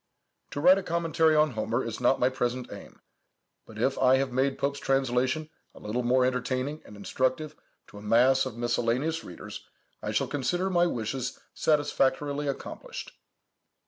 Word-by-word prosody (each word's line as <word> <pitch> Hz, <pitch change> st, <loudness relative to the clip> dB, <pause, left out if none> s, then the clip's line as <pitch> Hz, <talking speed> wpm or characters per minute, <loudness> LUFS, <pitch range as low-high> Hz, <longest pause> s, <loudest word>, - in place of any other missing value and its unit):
To -, -, -5 dB
write 180 Hz, +5 st, +6 dB
a -, -, -4 dB
commentary 165 Hz, -2 st, +2 dB
on 150 Hz, -1 st, +4 dB
Homer 115 Hz, +2 st, -1 dB
is 115 Hz, +1 st, -5 dB
not 125 Hz, +2 st, +3 dB
my 125 Hz, -, +4 dB
present 125 Hz, -2 st, -3 dB
aim; 100 Hz, -, -12 dB, 0.7 s
but 110 Hz, -, -12 dB
if 130 Hz, +4 st, 0 dB
I 130 Hz, 0 st, +5 dB
have 135 Hz, 0 st, 0 dB
made 135 Hz, +2 st, +1 dB
Pope's 140 Hz, 0 st, -1 dB
translation 135 Hz, +3 st, 0 dB, 0.2 s
a -, -, -12 dB
little 110 Hz, +4 st, -2 dB
more 125 Hz, +1 st, +3 dB
entertaining 130 Hz, +3 st, -2 dB
and 105 Hz, -, -12 dB
instructive 130 Hz, +8 st, -1 dB, 0.3 s
to 105 Hz, -, -11 dB
a -, -, -12 dB
mass 130 Hz, +5 st, +4 dB
of 120 Hz, -3 st, -8 dB
miscellaneous 120 Hz, +7 st, 0 dB
readers, 90 Hz, -, -9 dB, 0.4 s
I -, -, -4 dB
shall -, -, +1 dB
consider 175 Hz, +7 st, -1 dB
my 175 Hz, -1 st, +3 dB
wishes 125 Hz, -1 st, -3 dB
satisfactorily 145 Hz, -1 st, +1 dB
accomplished. 140 Hz, -, -6 dB
130 Hz, 160 wpm, -28 LUFS, 120-150 Hz, 0.7 s, write